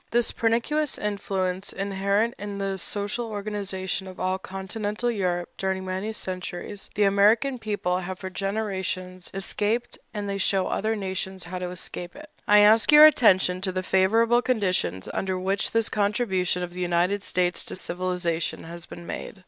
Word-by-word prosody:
This 240 0 +1
pernicious 240 +7 0
influence, 195 -2 -2
inherent 200 +3 0
in 205 0 -5
the 195 -1 -2
social 205 +6 -2
organization 200 -2 -3
of 185 - -10
all 185 +1 0
Continental 205 +5 -3
Europe 180 -5 -1
during 190 0 -1
many 190 +3 -3
centuries, 185 0 -6
the 210 - +3
American 215 +7 +4
people 205 -5 -1
have 185 0 -5
for 190 -1 -6
generations 190 -3 -3
escaped, 205 +4 -1
and 205 -2 -4
they 200 0 -2
show 190 -1 +2
other 220 +2 0
nations 190 -2 -4
how 180 +1 -5
to 180 0 -3
escape 175 0 -6
it. 300 +1 -12 0.2
I 210 0 +7
ask 215 +4 +6
your 300 +1 +11
attention 190 -10 +5
to 190 -1 +1
the 185 0 -2
favorable 225 +6 +3
conditions 185 - 0
under 190 -1 -1
which 195 +2 0
this 230 -1 +1
contribution 200 -4 0
of 175 0 -6
the 180 - -5
United 180 +3 +1
States 180 -2 0
to - - -5
civilization 180 -2 -2
has 170 +1 -8
been 175 - -10
made. 195 - -6
195 Hz, 160 wpm, -26 LUFS, 185-210 Hz, 0.2 s, your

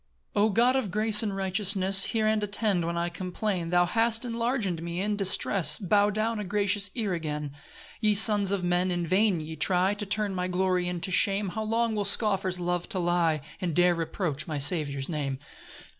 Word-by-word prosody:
1 205 - +2
O - - +1
God 240 +5 +2
of 260 -7 -1
grace 215 +2 +6
and 205 -3 -3
righteousness, 195 0 +2
Hear 220 -1 -1
and 215 -1 0
attend 205 -4 +1
when 170 0 -3
I 170 0 -1
complain; 180 0 -4
Thou 175 0 +2
hast 225 +5 +1
enlarg'd 230 -7 -2
me 170 +1 -5
in 205 +2 -1
distress, 190 -5 +1
Bow 205 +1 +1
down 215 +2 -2
a - - -4
gracious 200 +1 +1
ear 215 -6 -2
again. 150 -3 -5 0.5
2 215 - +1
Ye 210 - +3
sons 205 -2 +5
of 200 -2 -2
men, 180 +1 0
in 175 -1 -2
vain 190 +1 +1
ye 160 +1 -8
try 180 +5 +1
To 205 0 -5
turn 210 -1 -1
my 180 -1 -3
glory 185 0 -1
into 180 +1 -4
shame; 195 +2 +1
How 220 +4 -5
long 225 +1 -1
will 210 -1 -2
scoffers 195 -3 0
love 175 0 -3
to - - -2
lie, 170 -3 0 0.2
And 175 -4 -3
dare 180 0 +3
reproach 165 -2 -4
my 155 -2 -4
Saviour's 140 -2 +2
name! 140 -5 -4
190 Hz, 200 wpm, -26 LUFS, 175-210 Hz, 0.5 s, grace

